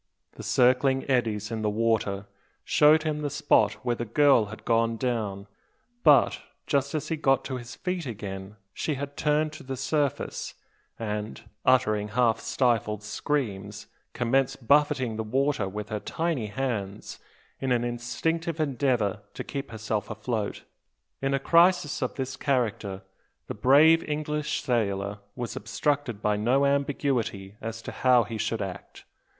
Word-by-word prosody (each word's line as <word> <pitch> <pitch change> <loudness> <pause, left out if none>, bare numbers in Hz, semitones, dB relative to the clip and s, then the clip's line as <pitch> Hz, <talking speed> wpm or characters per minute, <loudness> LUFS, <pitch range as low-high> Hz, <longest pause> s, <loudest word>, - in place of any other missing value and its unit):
The - - -11
circling 130 +2 +3
eddies 115 -5 0
in 110 -1 -3
the 105 - +1
water 105 -2 0 0.4
showed 155 +1 +5
him 150 -1 -2
the 145 - -1
spot 140 -7 +3
where 120 -1 +1
the 120 - -3
girl 130 0 +4
had 110 +1 -10
gone 115 0 +2
down; 110 -6 -2 0.6
but, 145 -5 +5 0.2
just 140 +1 0
as 150 - -3
he 165 - 0
got 135 -3 +2
to 130 - -3
his 120 +1 -9
feet 180 -4 -3
again, 100 -3 -6 0.2
she 155 - -2
had 140 +1 -6
turned 150 +1 +1
to - - -9
the 135 0 -5
surface; 145 0 -1 0.4
and, 105 0 -4 0.2
uttering 110 -5 +3
half 115 0 +2
stifled 110 -5 0
screams, 105 -5 -3 0.3
commenced 130 0 0
buffeting 140 -6 +3
the 110 - -2
water 130 -2 0
with 105 +2 -6
her 105 -2 -2
tiny 160 -4 -2
hands, 105 -4 -4 0.4
in 135 -1 -1
an 120 -1 +2
instinctive 150 +8 -2
endeavour 125 -8 0
to - - -4
keep 140 -1 -5
herself 110 -2 -3
afloat. 110 0 -3 0.6
In 135 0 +1
a - - 0
crisis 170 +1 +3
of 130 - -2
this 130 0 -4
character, 115 -8 -1 0.4
the - - -5
brave 155 +5 +5
English 150 0 -2
sailor 100 -5 -1 0.2
was 120 -2 -4
obstructed 120 -1 -2
by 105 0 +2
no 125 +6 +2
ambiguity 135 -8 -1
as 115 0 -6
to - - -6
how 125 -2 +4
he 110 0 -6
should 110 0 -1
act. 95 -2 -8
125 Hz, 150 wpm, -27 LUFS, 105-140 Hz, 0.6 s, showed